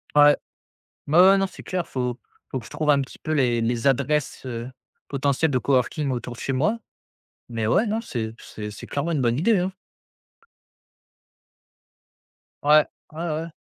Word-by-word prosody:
Ouais. 145 0 +8 0.7
Ouais, 155 +4 +4
ouais, 190 +2 +8
non, 195 0 +1
c'est - - -12
clair, 185 -1 -2
il - - -22
faut 125 -2 -2 0.3
il - - -38
faut 130 - 0
que 115 - -12
je - - -11
trouve 155 -1 -1
un 140 -1 +5
petit 135 - -8
peu 155 - -2
les 125 -5 +2
les 115 +2 0
adresses, 140 +2 0
heu, 120 -1 -5 0.4
potentielles 140 +2 +1
de 130 - +2
coworking 135 +3 +1
autour 125 -1 -4
de - - -12
chez 135 - -2
moi, 160 - +1 0.7
mais 115 -2 -2
ouais, 195 - +3
non, 220 +2 -1
c'est 115 - -4
c'est 105 -1 -8
c'est 105 - -9
clairement 145 +4 -2
une 150 -5 0
bonne 120 -1 +2
idée, 215 +6 +3
hein. 185 +2 -1 2.9
Ouais. 150 +1 +6 0.3
Ouais, 155 - -8
ouais. 160 +1 -3
140 Hz, 180 wpm, -24 LUFS, 125-160 Hz, 2.9 s, Ouais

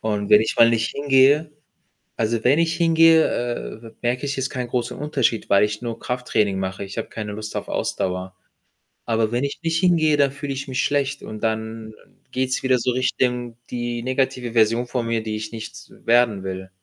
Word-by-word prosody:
Und 105 -2 -2
wenn 105 0 +8
ich 110 - -1
mal 115 0 +7
nicht 115 -1 0
hingehe 140 +2 +3 0.7
also, 110 0 -1
wenn 140 +5 +4
ich 165 -1 +1
hingehe, 165 -1 +5 0.6
äh, 115 - -11
merke 125 +4 -1
ich 140 - -2
jetzt 135 0 -2
keinen 125 -2 -3
großen 120 0 -2
Unterschied, 135 -6 -1
weil 100 0 +5
ich 105 +2 -1
nur 115 -1 -5
Krafttraining 110 -6 -1
mache. 95 +1 -4
Ich 100 +3 -6
habe - - -4
keine 105 -2 -5
Lust 110 +1 -7
auf - - -4
Ausdauer. 90 0 -2 0.7
Aber 115 -1 +1
wenn 120 +3 0
ich 140 - -4
nicht 165 -1 0
hingehe, 160 -5 +3
dann 140 -1 +4
fühle 140 +1 -5
ich 135 +1 -5
mich 130 0 -1
schlecht 140 -1 0
und 110 0 -8
dann 110 0 -3 0.4
geht's 130 0 -1
wieder 130 -1 +3
so 125 +1 0
Richtung 125 -1 -1
die 120 -1 -3
negative 130 -1 -1
Version 115 +1 +3
von 120 -1 -2
mir, 115 -1 0
die 110 -1 -3
ich 110 +1 -6
nicht 110 -1 -9
werden 115 -4 +3
will. 95 0 -5
120 Hz, 195 wpm, -22 LUFS, 110-135 Hz, 0.7 s, wenn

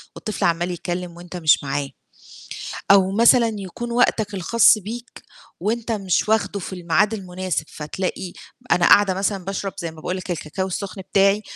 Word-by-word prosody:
والطفل 215 - -3
عَمَّال 175 +1 +1
يتكلم 175 0 -5
وأنت 175 +1 -8
مش 160 -4 +3
معاه، 140 0 -2 1.0
أو 195 -1 +6
مثلًا 230 +2 +5
يكون 220 +5 -6
وقتك 220 -3 +1
الخاص 215 +4 +4
بيك، 230 +4 -8 0.4
وأنت 230 +1 -1
مش 195 -1 0
واخدُه 220 -2 +1
في - - -7
الميعاد 180 +5 +1
المناسب 185 -4 -3
فتلاقي 180 +3 -4 0.4
أنا 175 -1 +4
قاعدة 200 -2 +6
مثلًا 195 0 -2
باشرب 195 0 -3
زي 170 -3 -4
ما 160 - -15
باقول 180 +4 -3
لك 185 0 -7
الكاكاو 175 +2 -3
السخن 190 +1 -5
بتاعي، 200 +2 +4
190 Hz, 155 wpm, -22 LUFS, 175-210 Hz, 1.0 s, أو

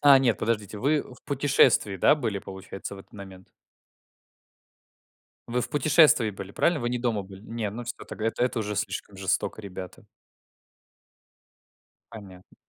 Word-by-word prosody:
А 140 -2 +8
нет, 120 -6 +2
подождите- 105 -2 -2
вы 145 +4 +2
в 125 - -15
путешествии, 130 -7 +3
да, 120 - +5
были, 115 -9 -2
получается, 95 +1 -8
в - - -11
этот 95 - -15
момент? 95 -2 -11 2.0
Вы 125 +1 0
в - - -3
путешествии 150 -5 +4
были, 100 -1 -8
правильно? 170 - +2
Вы 120 - -1
не 125 - -1
дома 115 -4 0
были? 95 0 -12
Не, 115 -1 -4
ну 120 +4 -6
всё 120 - -6
тогда. 110 - -4
Это 115 - +1
это 125 -1 -1
уже 105 -1 -3
слишком 95 +1 -4
жестоко, 95 +2 -1
ребята. 95 -3 -9 2.1
Понятно. 95 -4 -12
110 Hz, 150 wpm, -26 LUFS, 100-125 Hz, 2.1 s, А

